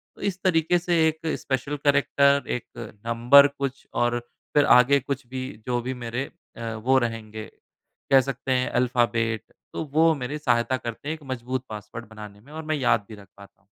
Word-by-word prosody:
तो - - -16
इस 190 -2 -2
तरीके 175 -1 +3
से 175 0 0
एक 160 +1 -2 0.2
स्पेशल 140 +2 -2
कैरेक्टर, 140 0 +3
1 125 - -2 0.4
नंबर 120 +5 +6
कुछ 140 -1 -5
और 120 0 +1 0.4
फिर 145 - +5
आगे 140 +3 +5
कुछ 135 -1 -4
भी 130 +1 -5 0.3
जो 120 -1 0
भी 130 +2 -3
मेरे 120 +1 -4 0.3
अ, 115 -1 -4
वो 130 +5 +2
रहेंगे, 110 -2 -4 0.7
कह 135 -1 +7
सकते 135 0 -4
हैं 125 0 +1
अल्फ़ाबेट। 120 -3 +1 0.3
तो - - -3
वो 160 +1 +5
मेरी 140 +2 -4
सहायता 125 -2 +1
करते 115 +4 -7
हैं - - 0
एक 155 - -16
मजबूत 130 +1 -4
पासवर्ड 110 +2 -8
बनाने 105 -2 -11
में 140 +7 -18
और 160 0 -6
मैं 155 0 0
याद 120 -6 +1
भी 110 - -8
रख 100 -1 -15
पाता 100 0 -16
हूँ। - - -36
125 Hz, 185 wpm, -25 LUFS, 115-140 Hz, 0.7 s, कह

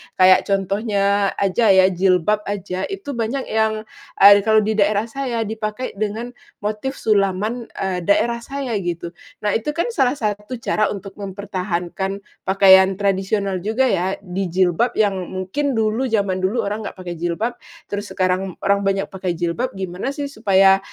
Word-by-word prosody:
kayak 185 0 +5
contohnya 200 0 +1
aja 200 +4 +1
ya, 190 0 +5
jilbab 185 +2 +2
aja 195 -2 -3
itu 390 -7 -6
banyak 235 +4 -2
yang, 220 0 +1 0.4
eee, 200 +1 +9
kalau 220 -1 +5
di 215 +1 -1
daerah 210 +2 +2
saya 250 -2 -3
dipakai 220 +1 -4
dengan 215 +3 -3 0.3
motif 215 +6 -2
sulaman, 210 +3 +1 0.2
eee, 190 -2 -1
daerah 235 +3 +2
saya, 270 -5 -3
gitu. 175 -3 -3 0.3
Nah 210 - +1
itu 260 +7 -4
kan 340 +9 -1
salah 265 - +2
satu 210 +2 -3
cara 215 -2 0
untuk 195 -1 -6
mempertahankan 195 -1 -4 0.2
pakaian 190 0 +6
tradisional 195 0 0
juga 220 +8 +1
ya, 185 +2 0
di 190 0 -3
jilbab 185 +6 +1
yang 205 -2 +2
ng 180 - -6 0.2
mungkin 280 +8 -1
dulu 225 +4 0
zaman 200 -5 0
dulu 200 +6 0
orang 210 +1 -3
nggak - - -8
pakai 180 -2 -6
jilbab, 175 +8 -2 0.3
terus 205 0 -3
sekarang 185 0 -1
orang 200 0 +3
banyak 195 0 +1
pakai 185 -2 -3
jilbab, 175 +9 -2
gimana 190 +7 -4
sih 285 -1 -4
supaya, 195 -4 +4
200 Hz, 160 wpm, -20 LUFS, 190-220 Hz, 0.4 s, eee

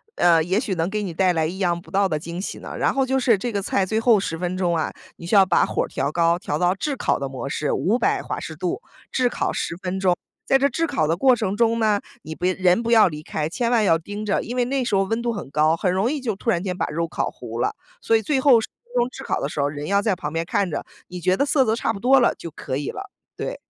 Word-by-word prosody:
呃， 170 -2 +4
也 185 +5 +1
许 220 -5 -2
能 165 +1 -1
给 210 +1 -2
你 185 -4 -4
带 185 +2 +2
来 160 -2 +1
意 175 +4 -4
想 175 -3 0
不 - - -17
到 195 0 +3
的 155 -4 -1
惊 170 +3 -6
喜 - - -5
呢。 - - -8
然 - - +1
后 270 -1 +1
就 265 +1 +1
是 235 -5 +3
这 240 +5 -3
个 200 -2 -1
菜 195 0 0
最 220 +4 0
后 225 -2 +4
10 165 -4 -3
分 180 +1 -2
钟 175 -2 +1
啊， 160 - -1 0.3
你 170 - -10
需 175 - +1
要 195 -1 +7
把 185 - +3
火 - - -1
儿 - - -4
调 140 +2 -2
高， 170 +1 +2
调 150 - -2
到 180 +2 +2
炙 280 +9 -3
烤 - - 0
的 140 - -2
模 135 +1 -6
式， 150 +1 -1
500 225 +7 +1
华 - - -4
氏 - - -7
度， - - -3 0.3
炙 255 -1 +2
烤 - - -1
10 - - -3
分 185 +1 -4
钟。 185 -2 +3 0.3
在 270 - +4
这 275 +1 +3
炙 330 +5 -1
烤 155 - 0
的 160 +2 +1
过 255 +7 +4
程 215 -4 -2
中 230 +1 +2
呢， 215 -2 +2 0.2
你 160 - -6
不 175 - -4
人 185 +2 +3
不 230 - -3
要 225 -3 +6
离 150 -3 -5
开， 155 -1 -3
千 235 +7 -1
万 235 -3 +3
要 165 -5 +3
盯 205 +5 -6
着， 205 - +1
因 240 - -6
为 250 -1 +2
那 265 +1 -1
时 235 -4 0
候 195 - +3
温 225 +4 -2
度 240 0 -1
很 200 -11 -6
高， 155 +3 +3
很 180 +1 +1
容 195 +7 +1
易 300 - -2
就 235 -6 -2
突 215 - -4
然 175 -5 +1
间 185 -2 -2
把 - - -1
肉 165 +2 -2
烤 170 - -2
糊 - - -8
了。 - - 0 0.3
所 225 - +3
以 220 - -4
最 270 +5 +1
后 260 -4 +6
10 225 - -4 0.2
分 240 +1 -18
钟 240 -1 +3
炙 - - -9
烤 - - -1
的 - - -2
时 150 - -6
候 140 - +2
儿， - - -2
人 145 0 -6
要 200 +4 +2
在 205 -2 +1
旁 150 -3 -5
边 165 0 0
看 185 +1 -1
着。 - - -3 0.2
你 180 - -7
觉 185 +2 +2
得 280 - +2
色 285 -1 +3
泽 220 -2 +1
差 225 - -1
不 200 - -7
多 265 +5 +5
了， 240 - +3
就 170 - -8
可 135 -3 -5
以 145 - -3
了。 390 0 -7 0.3
对。 - - -4
195 Hz, 315 characters per minute, -23 LUFS, 170-230 Hz, 0.3 s, 要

